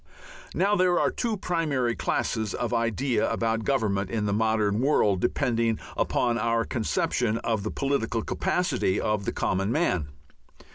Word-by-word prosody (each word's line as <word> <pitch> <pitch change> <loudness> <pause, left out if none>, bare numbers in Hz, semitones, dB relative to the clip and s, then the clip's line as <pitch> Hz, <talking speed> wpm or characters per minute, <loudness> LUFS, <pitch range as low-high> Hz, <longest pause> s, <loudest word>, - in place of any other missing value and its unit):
Now 200 +2 +2
there 180 -2 +3
are - - +2
two 230 -3 -2
primary 150 -10 0
classes 110 -3 -1
of 120 - -2
idea 115 +1 0
about 115 -1 0
government 105 -8 0
in 110 -2 -1
the 100 - 0
modern 110 -1 +1
world 105 -9 +2
depending 115 -3 +1 0.2
upon 120 -1 +1
our 115 +1 +1
conception 110 -1 0
of 110 -3 0
the 110 - -3
political 120 -5 -1
capacity 180 - 0
of 105 -2 -1
the - - -1
common 95 +3 -1
man. 90 - +1
115 Hz, 145 wpm, -26 LUFS, 105-135 Hz, 0.2 s, there